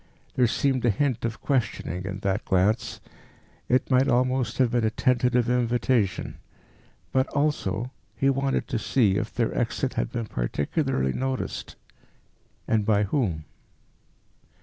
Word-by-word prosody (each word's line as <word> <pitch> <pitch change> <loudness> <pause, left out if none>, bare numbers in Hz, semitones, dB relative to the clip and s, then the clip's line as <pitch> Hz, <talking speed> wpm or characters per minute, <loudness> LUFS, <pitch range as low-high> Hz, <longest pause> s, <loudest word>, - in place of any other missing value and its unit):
There 125 -2 +3
seemed 130 +2 0
a 120 - +4
hint 120 +2 0
of 115 -1 -4
questioning 105 - -1
in 95 0 -5
that 100 0 0
glance; 105 +6 +1 0.7
it 130 +2 +2
might 130 +1 +4
almost 125 -1 +1
have 125 -3 +3
been 120 -2 +1
a 110 - +3
tentative 125 +1 +2
invitation. 120 -4 0 0.7
But, 130 0 +2
also, 130 -6 -1 0.3
he 135 - +2
wanted 135 0 +1
to - - -1
see 110 -5 +2
if - - -2
their - - -1
exit - - -1
had - - -2
been 115 -2 -3
particularly 70 - -1
noticed 130 0 -3 0.9
and 110 -2 +2
by 105 -1 +3
whom. 95 - -1
120 Hz, 135 wpm, -26 LUFS, 100-130 Hz, 0.9 s, a